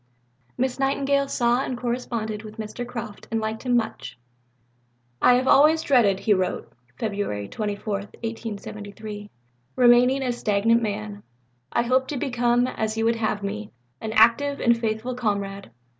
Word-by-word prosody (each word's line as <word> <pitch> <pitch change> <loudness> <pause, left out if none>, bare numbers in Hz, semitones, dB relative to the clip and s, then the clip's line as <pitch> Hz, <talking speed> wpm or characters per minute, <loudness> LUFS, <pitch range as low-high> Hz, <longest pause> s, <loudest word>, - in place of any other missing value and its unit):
Miss 260 +1 -1
Nightingale 275 +1 +1
saw 240 -1 +2
and 255 - -3
corresponded 235 -3 -3
with 215 0 -11
Mr. 220 +3 -5
Croft, 235 -4 -7
and 225 - 0
liked 220 0 -3
him 245 -2 +2
much. 225 - -4 1.0
"I 250 - +6
have 255 +1 +1
always 310 +3 +5
dreaded," 225 -10 +3
he 215 - +3
wrote 185 -2 -1 0.3
(Feb. 200 - -3
24, 210 0 -3
1873), 210 0 -6 0.5
"remaining 250 +2 +5
a 250 - 0
'stagnant 230 0 +2
man.' 105 - -4 0.5
I 235 - +2
hope 260 +2 +2
to 290 - -3
become, 245 -2 +1
as 220 -3 -3
you 225 - +1
would 230 0 +2
have 215 -2 -1
me, 210 +1 -4 0.3
an 220 - -4
active 235 +6 +4
and 235 -1 +4
faithful 230 +2 -2
comrade." 200 - -3
230 Hz, 145 wpm, -24 LUFS, 210-250 Hz, 1.0 s, I